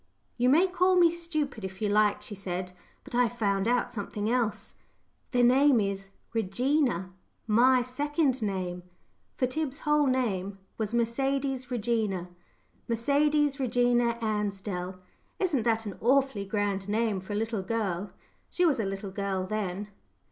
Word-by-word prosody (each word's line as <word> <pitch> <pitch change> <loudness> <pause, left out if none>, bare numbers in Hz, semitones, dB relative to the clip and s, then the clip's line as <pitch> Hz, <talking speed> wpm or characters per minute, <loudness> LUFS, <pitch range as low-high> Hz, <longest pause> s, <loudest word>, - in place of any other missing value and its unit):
"You 250 +1 +2
may 320 +8 +6
call 370 0 +2
me 345 -2 +6
stupid, 310 - -3
if 190 0 -6
you 215 - 0
like," 210 0 +2
she - - -7
said, 185 -2 -4 0.3
"but 280 - -12
I've 240 -1 +1
found 200 -2 +1
out 245 +1 +1
something 210 0 -3
else. 240 -4 -1 0.6
The 245 -1 +2
name 260 +1 +5
is 195 -1 -2 0.2
'Regina' 225 - 0 0.3
my 245 +3 +4
second 285 +1 0
name;" 185 -4 -2 0.5
for 255 - +1
Tib's 280 +2 -3
whole 300 -1 +3
name 200 -7 -1 0.2
was 220 +1 -2
Mercedes 265 +2 0
Regina. 220 -6 -1 0.6
"Mercedes 285 +4 +2
Regina 245 -2 +2
Ansdell" 200 -4 -2 0.4
isn't 335 -10 +1
that 225 0 +1
an 205 - -5
awfully 260 -4 +2
grand 200 -1 -1
name 215 -2 +1
for 190 +3 -7
a - - -1
little 225 -1 -1
girl? 200 -2 -2 0.4
She 360 - +1
was 295 -7 +3
a 220 - 0
little 195 0 -4
girl 195 -1 -2
then. 205 0 -3
230 Hz, 145 wpm, -28 LUFS, 200-265 Hz, 0.6 s, may